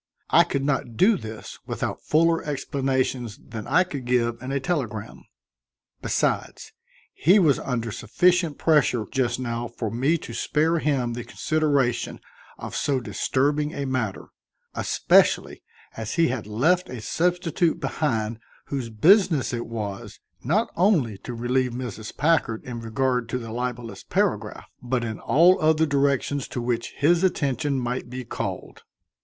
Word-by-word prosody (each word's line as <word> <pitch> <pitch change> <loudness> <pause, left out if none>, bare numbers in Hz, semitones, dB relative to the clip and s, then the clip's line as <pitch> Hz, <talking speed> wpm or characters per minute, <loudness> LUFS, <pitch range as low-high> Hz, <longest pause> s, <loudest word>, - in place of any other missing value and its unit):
I - - +6
could 140 - -2
not 130 -5 -1
do 215 +4 +5
this 110 - -8
without - - -3
fuller 165 +1 +2
explanations 130 -5 -2
than 110 -1 -8
I 165 +8 +4
could 140 -8 -7
give 120 -1 +1
in 130 +1 -5
a 140 - 0
telegram. 130 -8 -3 0.8
Besides, - - -1 0.4
he 180 +7 +4
was 160 -9 +4
under 115 -4 -3
sufficient 175 - +1
pressure 135 -8 +2
just 125 -2 0
now 120 -1 -3
for 115 -2 -5
me 135 +9 +1
to 120 - -9
spare 160 +7 +1
him 135 -6 0
the 120 0 -5
consideration 140 -1 0 0.4
of - - -7
so 140 -2 +1
disturbing 140 +7 0
a 140 - -3
matter, 130 -7 -3 0.4
especially - - +2 0.3
as 110 -1 -4
he 165 -3 +3
had 120 -5 -3
left 160 +13 +1
a 125 - -6
substitute 175 - 0
behind 115 -6 -1 0.3
whose 130 -5 -3
business 160 - +4
it 120 -1 -3
was, 105 -4 -6 0.2
not 200 - +1
only 160 - +2
to 120 - -7
relieve 125 +1 0
Mrs. 115 -4 -6
Packard 145 -7 +1
in 120 -2 -6
regard 125 +1 -1
to 125 - -1
the 115 -2 -7
libelous 120 -3 -4
paragraph, - - -1 0.2
but 125 0 -1
in 110 -2 -4
all 175 +5 +4
other 155 0 +4
directions 140 -1 0
to - - -5
which 120 -1 -2
his 170 +5 +3
attention 145 -5 0
might 125 0 -3
be 125 0 -6
called. - - -5
130 Hz, 145 wpm, -24 LUFS, 120-155 Hz, 0.8 s, I